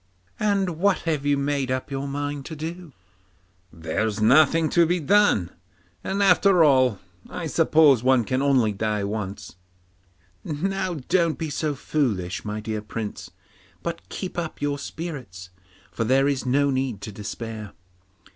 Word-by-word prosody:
'And 195 -5 0
what 200 +1 +3
have 150 -4 -1
you 145 -1 +3
made 140 -1 -1
up 130 +2 -3
your 135 +1 -3
mind 145 0 -3
to 160 - -7
do?' 165 +2 -7 0.8
'There's 100 +7 -2
nothing 155 +8 +5
to 170 -1 +4
be 175 +2 +1
done, 170 - +3 0.5
and 200 +1 0
after 190 -2 +5
all 130 -7 +4 0.3
I 175 - -5
suppose 155 -5 +4
one 130 -1 +3
can 130 +5 -1
only 130 -6 +3
die 105 0 -2
once.' 100 -2 -5 0.9
'Now, 185 +4 -2
don't 170 -4 +2
be 160 -2 -4
so 150 0 -1
foolish, 110 -11 -2
my 105 0 -4
dear 110 0 -4
Prince; 105 0 -6 0.5
but - - -5
keep 180 -2 -5
up 165 -2 -5
your 145 -1 -1
spirits, 125 - -7 0.4
for 115 - -2
there 135 +4 +3
is 135 -2 -1
no 140 +2 +2
need 130 -5 -2
to 105 - -6
despair. 105 +1 -7
140 Hz, 145 wpm, -24 LUFS, 110-165 Hz, 0.9 s, nothing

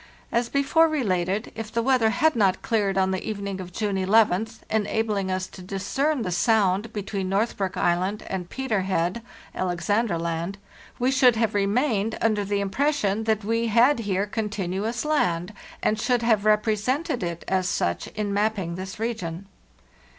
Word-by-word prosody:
As 235 0 +1
before 290 +4 +3
related, 200 - -1
if 220 -1 -6
the 230 0 0
weather 250 -3 +3
had 315 +7 +2
not 195 -5 +2
cleared 205 -4 +1
on 190 0 +2
the 190 - -2
evening 200 -3 -4
of 180 -1 -9
June 205 0 -1
11th, 215 +2 +2
enabling 210 -2 0
us 185 0 -1
to 185 - -12
discern 230 +9 -1
the 180 - -3
sound 205 +1 +2
between 200 -3 -3
Northbrook 195 -1 -1
Island 185 +4 0
and 180 -2 -4
Peter 265 -7 -1
Head 185 +2 -1 0.3
(Al 185 - -2
exandra 200 +1 0
Land), 170 +3 -3 0.4
we 250 +2 +1
should 260 -3 +5
have 225 -1 +1
remained 210 +1 +1
under 215 -2 +1
the 200 0 -1
im 195 -1 -3
pression 225 -7 0
that 220 -1 +1
we 230 +2 0
had 235 +5 +4
here 200 -3 0
continuous 210 +2 -3
land, 180 - 0 0.3
and 215 - +1
should 245 -1 +1
have 220 -3 +2
represented 220 +7 +1
it 170 -1 -4
as 185 -1 +1
such 85 - -1
in 210 -2 -3
mapping 205 -4 0
this 185 +3 -7
region. 200 -6 -3
210 Hz, 165 wpm, -25 LUFS, 190-230 Hz, 0.4 s, should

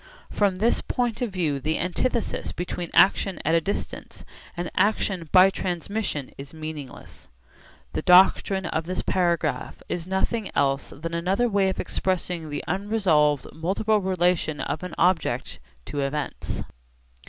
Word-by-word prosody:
From 200 -3 +2
this 220 +6 +1
point 240 -2 -2
of 245 - 0
view 160 -7 -1
the 155 +3 -1
antithesis 215 +7 -1
between 175 -1 -4
action 195 0 +4
at 160 - +2
a 165 - +4
distance 200 - -5 0.3
and 175 0 -3
action 190 -4 +1
by 185 +1 +7
transmission 180 -5 -3
is 140 +3 -9
meaningless. 155 -4 -8 0.7
The - - -1
doctrine 190 +1 +5
of 160 -1 -2
this 185 - -2
paragraph 175 -2 -1
is 175 0 -4
nothing 195 +3 -1
else 140 -1 +1
than 165 +4 -6
another 185 +8 +1
way 200 -3 +2
of 190 - -4
expressing 180 -3 -2
the 145 - -4
unresolvable 180 - +1
multiple 200 +6 +1
relation 180 -5 +1
of 145 - -3
an 180 - -6
object 180 -2 +1 0.3
to 145 - -4
events. 140 +1 -3
180 Hz, 140 wpm, -25 LUFS, 160-195 Hz, 0.7 s, by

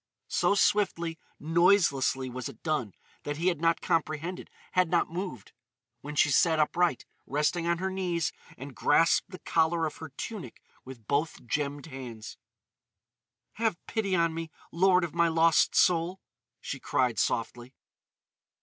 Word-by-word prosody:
So 200 - +2
swiftly, 170 -6 +1 0.2
noiselessly 165 -5 +3
was 125 0 -5
it 110 - -14
done 140 - -2 0.3
that 145 0 -4
he 175 +3 +2
had 170 -4 -3
not 165 0 +2
comprehended—had 165 +2 -2
not 170 -2 +1
moved—when 150 - -9
she 150 - +4
sat 160 +3 +4
upright, 165 -1 +1 0.2
resting 150 +4 0
on 170 0 +2
her 190 +2 -2
knees, 175 -4 -1 0.2
and 135 +1 -9
grasped 165 +3 +3
the 185 - -9
collar 165 -1 +1
of 155 - -5
her 160 - -8
tunic 195 - -8 0.2
with 130 -4 -11
both 145 +2 -1
gemmed 140 +3 -2
hands. 125 -7 -9 1.2
"Have 220 -6 +1
pity 200 -4 -1
on 170 -2 +2
me, 165 0 -5 0.2
lord 180 +1 +4
of 170 - -3
my 170 0 +3
lost 165 0 +3
soul!" 175 +2 +3 0.4
she - - -6
cried 125 -5 0
softly. 120 +2 -2
165 Hz, 140 wpm, -28 LUFS, 140-175 Hz, 1.2 s, she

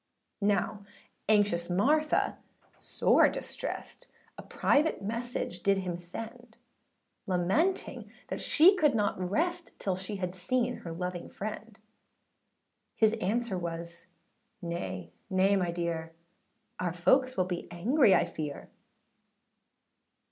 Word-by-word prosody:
Now 205 +1 +1 0.5
anxious 205 -5 +3
Martha 295 - +2 0.4
sore - - +4
distressed, - - -6 0.3
A - - -8
private 300 -5 +1
message 230 -4 -3
did 200 0 +3
him 180 -2 -3
send, 225 +6 -9 0.7
Lamenting 195 - 0 0.2
that - - -3
she 355 +6 +6
could 300 -8 +3
not 200 -4 0
rest, 345 - -1
Till 190 -2 -1
she 190 +3 -5
had 180 -2 -3
seen 245 +7 0
her 170 - -8
loving 180 +1 -4
friend: 215 +1 -6 1.2
His 220 -1 +4
answer 215 0 0
was, 170 0 -6 0.6
âNay, 95 - -4 0.2
nay, 190 +1 +3
my 180 -3 +1
dear, 170 -1 -3 0.7
Our 175 -2 -1
folks 255 +10 +3
will 185 -1 +2 0.2
angry 225 - +3
be 190 - +7
I - - +3
fear. 150 -2 -6
195 Hz, 110 wpm, -30 LUFS, 175-235 Hz, 1.2 s, be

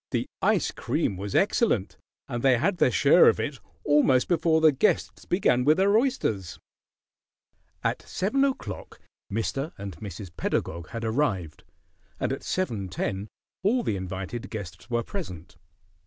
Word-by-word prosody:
The - - -1
ice - - +2
cream 100 - -1
was 100 +1 -5
excellent, 195 - +2 0.3
and 120 -1 -3
they 130 -1 +4
had 175 - +1
their 130 - +4
share 120 - +6
of - - 0
it - - -3 0.2
almost 145 -3 +4
before 165 -2 +3
the 160 -1 +6
guests 145 +10 0
began 125 -9 +2
with 150 +4 +4
their 200 +2 +4
oysters. 110 - 0 1.3
At - - 0
seven 240 +9 0
o'clock 260 - -3 0.3
Mr. 135 +8 -2
and 100 -3 -6
Mrs. 95 -2 -8
Pedagog 85 +1 -2
had 115 -1 -5
arrived, 110 - -1 0.6
and - - 0
at - - -5
seven 115 - -2
ten 95 +2 -3 0.3
all 230 +6 +2
the 105 - 0
invited 95 +6 -5
guests 100 -2 -8
were 120 -1 0
present. 90 - -7
120 Hz, 145 wpm, -26 LUFS, -, 1.3 s, share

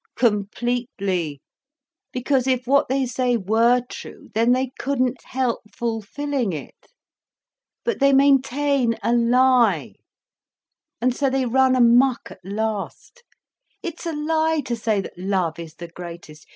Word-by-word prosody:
"Completely, 205 - -1 0.7
because 255 +1 0
if 255 -1 +1
what 280 +3 +3
they 265 +1 +1
say 250 0 0
were 230 +4 +3
true, - - -10
then 230 +2 +3
they 255 0 +1
couldn't 255 -2 -1
help 255 -2 -1 0.2
fulfilling 235 +1 -2
it. 150 - -9 1.0
But 470 - -1
they 275 0 +5
maintain 275 -2 +3
a 235 - +2
lie, 245 +1 +3 1.1
and 250 +1 +1
so 275 0 +1
they 265 0 0
run 260 +2 +3
amok 245 +1 +4
at 185 - -14
last. 215 - -4 0.6
It's 335 0 -5
a 330 - -2
lie 315 0 0
to 240 - -2
say 220 -3 0
that 185 - -10
love 185 -4 -1
is 165 -1 -9
the 170 - -8
greatest. 170 -3 -10
245 Hz, 130 wpm, -22 LUFS, 215-265 Hz, 1.1 s, they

